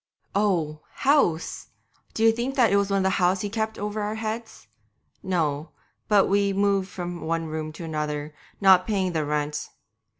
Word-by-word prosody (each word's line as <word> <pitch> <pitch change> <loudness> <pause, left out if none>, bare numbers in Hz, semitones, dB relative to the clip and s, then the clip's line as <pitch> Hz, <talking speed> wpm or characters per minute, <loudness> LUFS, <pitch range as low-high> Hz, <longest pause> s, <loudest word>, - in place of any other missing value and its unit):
'Oh! 170 -7 0
"house"! 265 - +1 0.5
d'ye 225 0 +5
think 240 +4 -3
it 225 -6 +4
was 200 0 +2
one 195 -1 +1
house 190 -1 +2
he 205 - -3
kept 220 0 -2
over 210 +1 -3
our 210 +1 -2
heads? 220 +1 -5 0.6
No, 160 -5 -1 0.4
but 205 -2 +5
we 200 0 +2
moved 195 -1 +1
from 175 -2 -6
one 165 0 -1
room 155 0 -4
to 165 - -8
another, 150 -2 -3 0.3
not 190 -2 +6
paying 195 -4 0
the 160 -2 0
rent. 150 0 -2
190 Hz, 155 wpm, -25 LUFS, 160-210 Hz, 0.6 s, not